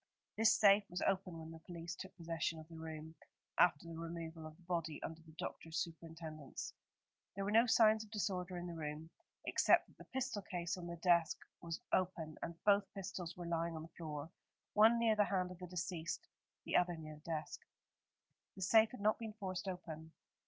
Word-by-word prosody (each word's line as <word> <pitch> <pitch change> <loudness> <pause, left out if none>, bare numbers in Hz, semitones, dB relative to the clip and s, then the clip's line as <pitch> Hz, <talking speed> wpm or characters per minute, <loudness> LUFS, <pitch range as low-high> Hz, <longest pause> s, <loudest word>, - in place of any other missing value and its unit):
This 220 0 +6
safe 200 -1 +7
was 180 - -2
open 185 -3 +1
when 160 0 -7
the 165 - -9
police 170 0 -6
took 190 - -9
possession 165 -1 -1
of 155 0 -9
the 165 -1 -9
room, 160 0 -6 0.5
after 165 -2 +5
the 165 -1 -6
removal 165 -1 -5
of 155 - -11
the 180 - -20
body 165 -3 -1
under 160 0 -5
the 160 -1 -16
doctor's 160 0 -4
superintendence. 160 -3 -5 0.6
There 195 0 -2
were 205 - 0
no 230 +3 +6
signs 220 -1 +6
of 215 - -14
disorder 190 -4 -1
in 175 - -4
the 175 - -4
room, 155 0 -5 0.3
except - - +5
that - - -23
the - - -10
pistol 260 -5 -2
case 175 -2 -2
on 175 -2 -6
the 170 - -4
desk 170 -1 +4 0.2
was 165 -1 -4
open, 170 -4 0
and 170 - -4
both 200 -1 +4
pistols 185 -3 -5
were 175 - -5
lying 170 0 0
on 155 - -5
the 165 - -12
floor, 155 -1 -5 0.4
one 220 +3 +7
near 230 -2 +4
the 210 -1 +5
hand 185 -2 0
of 180 - -9
the 180 - -6
deceased, 175 -1 -3 0.4
the - - -1
other 175 -1 +2
near 155 -1 -8
the 170 - -5
desk. 155 -1 -3 1.0
The 190 - -4
safe 220 +3 +6
had 250 - -9
not 215 +1 +3
been 220 -2 -5
forced 190 -3 -4
open. 160 -3 -6
170 Hz, 200 wpm, -38 LUFS, 160-195 Hz, 1.0 s, safe